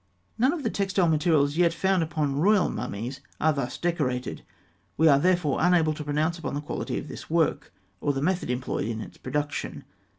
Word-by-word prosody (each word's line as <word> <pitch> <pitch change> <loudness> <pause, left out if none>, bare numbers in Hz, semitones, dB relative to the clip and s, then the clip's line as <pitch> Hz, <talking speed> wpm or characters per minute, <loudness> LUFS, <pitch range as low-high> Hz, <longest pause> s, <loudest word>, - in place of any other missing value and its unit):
None 255 +4 +4
of 325 -3 -4
the - - 0
textile 195 -2 +1
materials 155 -2 +2
yet 170 -1 +3
found 190 +1 +2
upon 155 -3 -1
royal 200 +3 +4
mummies 120 +3 -4 0.2
are 155 0 +3
thus 140 -3 -3
decorated; 130 -8 -1 0.6
we 160 - +5
are 140 -2 +6
therefore 175 -4 +2
unable 170 -3 +4
to 150 - -6
pronounce 155 +4 0
upon 165 - -4
the 145 - -2
quality 150 - -4
of - - -5
this - - -9
work, 155 -3 +1 0.3
or 145 - +1
the 135 - -2
method 180 +3 0
employed 125 -3 -2
in 115 -1 -3
its 110 - -9
production. 145 +2 -3
155 Hz, 190 wpm, -26 LUFS, 140-175 Hz, 0.6 s, are